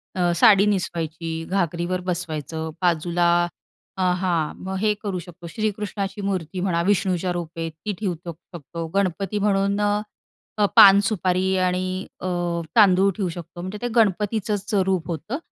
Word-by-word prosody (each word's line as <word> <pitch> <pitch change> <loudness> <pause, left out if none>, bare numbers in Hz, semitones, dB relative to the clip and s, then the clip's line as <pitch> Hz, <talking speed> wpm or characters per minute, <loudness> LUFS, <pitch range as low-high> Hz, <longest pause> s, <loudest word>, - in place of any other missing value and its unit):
अ, 175 -1 +2
साडी 200 +2 +6
निसवायची, 165 -4 -2
घागरीवर 180 -1 -1
बसवायचं. 160 -2 -4
बाजूला 175 0 +2 0.7
अ, - - -2 0.2
हां, 175 -4 0
मग 190 0 -3
हे 215 -1 +3
करू 195 -3 -2
शकतो. 175 0 -11
श्रीकृष्णाची 205 0 -3
मूर्ती 185 -2 -3
म्हणा, 180 -2 0
विष्णूच्या 185 -2 +1
रूपे 165 -1 -4
ती 165 +7 -6
ठेवू 195 -4 -1 0.2
शकतो. 170 0 -8
गणपती 195 +1 0
म्हणून 200 0 +1
अ, 205 0 +1 0.6
अ, 210 - +4
पान, 200 0 +9
सुपारी 190 -1 0
आणि 180 0 0 0.4
अ, - - -7 0.5
तांदूळ 195 -2 +5
ठेऊ 195 -4 0
शकतो. 170 0 -8
म्हणजे 185 +3 -5
ते 245 - -1
गणपतीचंच 210 -1 +1
रूप 185 -3 0
होतं. 170 - -4
185 Hz, 140 wpm, -23 LUFS, 170-200 Hz, 0.7 s, पान